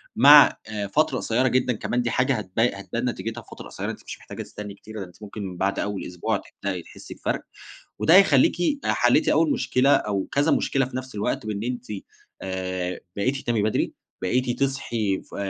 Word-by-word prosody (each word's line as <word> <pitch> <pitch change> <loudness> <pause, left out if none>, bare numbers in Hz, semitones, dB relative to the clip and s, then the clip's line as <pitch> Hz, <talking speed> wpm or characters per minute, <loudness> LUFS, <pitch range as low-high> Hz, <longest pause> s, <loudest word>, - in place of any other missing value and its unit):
مع 145 +4 +8
آآ 105 -2 -3
فترة 140 +3 +1
قصيرة 125 +3 +1
جدًا، 125 0 +2
كمان 120 +3 -1
دي 120 - -1
حاجة 130 +3 +2
هتب 100 -2 -5
هتبان 115 +2 0
نتيجتها 115 -1 -5
في - - -25
فترة - - -9
قصيَّرة، - - -4
أنتِ - - -9
مش - - -6
محتاجة - - -8
تستني 105 -1 -8
كتير، 110 +1 -8
أنتِ 90 +3 -14
ممكن 100 -3 -6
بعد 100 +2 0
أوَّل 105 -1 -3
أسبوع 90 -1 -2 0.2
تبدئي 95 -3 -2
تحسّي - - -11
بفرق، - - -2 0.6
وده 165 - +5
هيخلّيكِ 185 -9 +6 0.3
حلّيتِ - - +3
أوَّل 320 - +3
مشكلة 135 - +2
أو 100 -2 -1
كذا 140 +1 +2
مشكلة 135 -1 +2
في 125 0 -6
نفس 130 -2 -7
الوقت، 105 +1 -2
بإن 105 -1 -3
أنتِ 125 +1 -4 0.6
آآ 95 -1 -3 0.2
بقيتِ 130 +7 0
تنامي 120 -5 0
بدري، 110 - 0 0.3
بقيتِ 120 +6 0
تصحي 120 -7 -1
ف - - -14
110 Hz, 180 wpm, -24 LUFS, 100-130 Hz, 0.6 s, مع